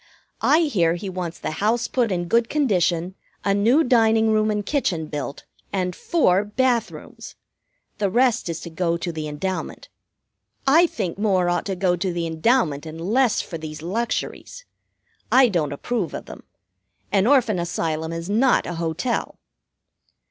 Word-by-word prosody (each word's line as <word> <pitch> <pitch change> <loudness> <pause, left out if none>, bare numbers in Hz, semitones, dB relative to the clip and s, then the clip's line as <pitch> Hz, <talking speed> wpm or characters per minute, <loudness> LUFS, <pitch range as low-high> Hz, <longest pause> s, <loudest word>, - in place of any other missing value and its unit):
I 315 - +4
hear 180 - +2
he 190 +3 -5
wants 175 -2 -5
the - - -4
house 225 +3 +1
put 240 -5 0
in 175 -1 -1
good 230 +4 +2
condition, 185 - +1 0.3
a 200 - +3
new 235 +10 +4
dining 225 -3 +3
room 215 0 +2
and 210 -1 -1
kitchen 190 - -1
built 145 -2 -6 0.3
and 180 -3 -1
four 200 - +2
bath 235 +2 +1
rooms. - - -11 0.6
The 200 -2 +1
rest 240 -2 +2
is 165 - -4
to 170 - -8
go 170 0 0
to 170 +1 -4
the 155 -2 -5
endowment. 180 +6 -4 0.8
I 320 +6 +5
think 195 - -4
more 190 -4 +2
ought 175 - -1
to 195 - -2
go 180 -1 +1
to 185 +1 -2
the 170 -1 -2
endowment 160 - +1
and 160 +1 -8
less 225 +7 +2
for 165 - -7
these 155 -1 -8
luxuries. 235 - -3 0.7
I 260 -1 +6
don't 160 -7 0
approve 195 +6 -3
of - - -7
them. - - -11 0.7
An 200 +1 +3
Orphan 240 -8 +3
Asylum 160 -2 -2
is 165 0 -5
not 235 +6 +3
a 175 - -4
hotel." 170 +8 -2
190 Hz, 165 wpm, -23 LUFS, 170-235 Hz, 0.8 s, I